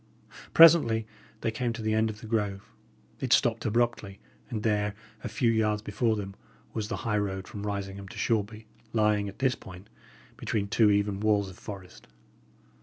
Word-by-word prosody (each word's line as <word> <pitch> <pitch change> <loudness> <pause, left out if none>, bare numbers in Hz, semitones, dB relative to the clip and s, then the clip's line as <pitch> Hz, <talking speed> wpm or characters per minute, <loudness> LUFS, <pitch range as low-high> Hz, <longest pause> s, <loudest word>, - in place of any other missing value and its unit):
Presently 150 -10 +7 0.4
they 115 - 0
came 120 +1 -2
to 115 - -6
the 110 0 +1
end 110 0 +2
of 110 +1 -8
the - - -9
grove. 105 -3 -2 0.5
It - - -3
stopped - - +3
abruptly; 115 -3 0 0.3
and 110 -5 -4
there, 105 -2 +1 0.3
a 120 - -3
few 115 +2 +1
yards 105 -2 +1
before 110 +2 0
them, 100 -2 -6 0.4
was 110 -2 -2
the 115 - -3
high 105 -2 +1
road 95 -2 -3
from 105 0 -6
Risingham 100 -1 -4
to - - -11
Shoreby, 110 0 -1 0.3
lying, 105 -2 +2
at 100 - -12
this 130 -1 +2
point, 90 -3 -12 0.5
between 100 -2 -2
two 105 +1 +4
even 100 -1 +1
walls 105 -2 +1
of 90 - -15
forest. 95 -3 -10
105 Hz, 175 wpm, -28 LUFS, 100-110 Hz, 0.5 s, Presently